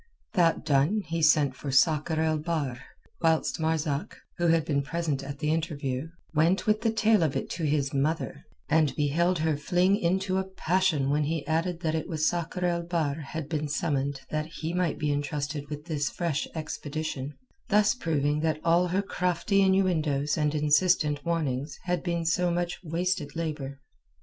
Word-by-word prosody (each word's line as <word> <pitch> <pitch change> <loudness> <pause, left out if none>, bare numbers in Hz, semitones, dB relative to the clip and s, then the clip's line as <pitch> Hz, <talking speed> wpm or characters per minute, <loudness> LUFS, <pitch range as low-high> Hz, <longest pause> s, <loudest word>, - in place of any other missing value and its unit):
That 170 -3 +2
done 150 +10 +2
he 165 +1 -2
sent 145 -4 +4
for 140 - -6
Sakr 155 +3 +3
el 160 -1 +1
Bahr, 150 -6 -2 0.4
whilst 160 -1 +2
Marzak, 160 -2 -1 0.2
who 175 - +2
had 165 -1 +3
been 140 -3 +1
present 150 -1 -2
at 140 +1 -6
the 150 +2 0
interview, 145 -4 -2 0.3
went 165 +5 +2
with 215 0 +2
the 225 - +2
tale 220 -2 +3
of 155 -4 +1
it - - -3
to 165 - -2
his 145 -2 0
mother, 150 +4 -1 0.2
and 155 -2 +2
beheld 170 +5 +1
her 160 -1 +1
fling 180 +6 +2
into 190 0 0
a - - 0
passion 185 -6 +1
when 150 +1 +2
he 160 0 -2
added 165 +2 -1
that 160 -3 0
it 160 - -2
was 155 -3 0
Sakr 175 +1 -1
el 170 -1 +1
Bahr 170 -4 -1
had 155 0 -5
been 150 -1 -2
summoned 145 -2 -1
that 155 0 -1
he 165 0 -5
might 180 -3 0
be 150 -1 0
entrusted 145 0 -3
with 150 0 -6
this 150 -3 -1
fresh 170 -5 -2
expedition, 155 -2 -4 0.3
thus 210 0 +4
proving 150 - 0
that 155 -1 0
all 170 +2 +3
her 185 +3 0
crafty 180 +1 +1
innuendoes 160 -7 +2
and 150 0 0
insistent 150 -1 +3
warnings 145 -4 -2
had 180 0 -1
been 170 -2 -2
so 175 +2 +2
much 175 0 -1
wasted 170 -2 -2
labour. 150 -4 -4
160 Hz, 175 wpm, -28 LUFS, 145-175 Hz, 0.4 s, sent